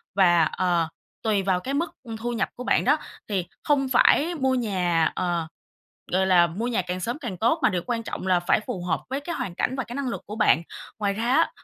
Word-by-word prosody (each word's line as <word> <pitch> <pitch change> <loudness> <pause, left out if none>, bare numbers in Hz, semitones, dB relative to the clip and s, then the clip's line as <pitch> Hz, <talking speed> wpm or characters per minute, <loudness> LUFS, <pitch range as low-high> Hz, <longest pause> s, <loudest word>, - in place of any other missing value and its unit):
và, 175 -4 +5
ờ, 175 0 +1 0.4
tùy 210 -3 +1
vào 185 -2 +1
cái 265 +9 -4
mức, 315 +3 -1
ư, 230 -3 -6
thu 240 +2 -2
nhập 235 - -1
của 250 - -6
bạn - - +2
đó. 290 +5 +4 0.3
Thì 190 -4 -1 0.2
không 275 -2 +2
phải 300 +6 +4
mua 265 -4 +1
nhà, 180 -9 +1
ờ, 175 -3 -1 0.7
gọi 190 +1 +3
là, 180 -2 +5
mua 190 +8 -4
nhà 240 -6 0
càng 180 +1 -4
sớm 240 +9 -3
càng 240 -11 -5
tốt, 235 - +2
mà - - +5
điều 180 -3 -1
quan 235 -2 -1
trọng 205 - -5
là 180 -2 +3
phải 175 +4 +2
phù 180 -3 -4
hợp 175 -3 0
với 270 +2 -1
cái 335 +4 -5
hoàn 180 - -4
cảnh 250 +8 -1
và 265 - -2
cái 240 - -9
năng 280 -2 -2
lực 235 - -4
của 210 - -6
bạn. 170 -7 +4 0.4
Ngoài 200 -2 0
ra 220 +3 -3
á, 325 +4 +4
210 Hz, 240 wpm, -25 LUFS, 180-255 Hz, 0.7 s, và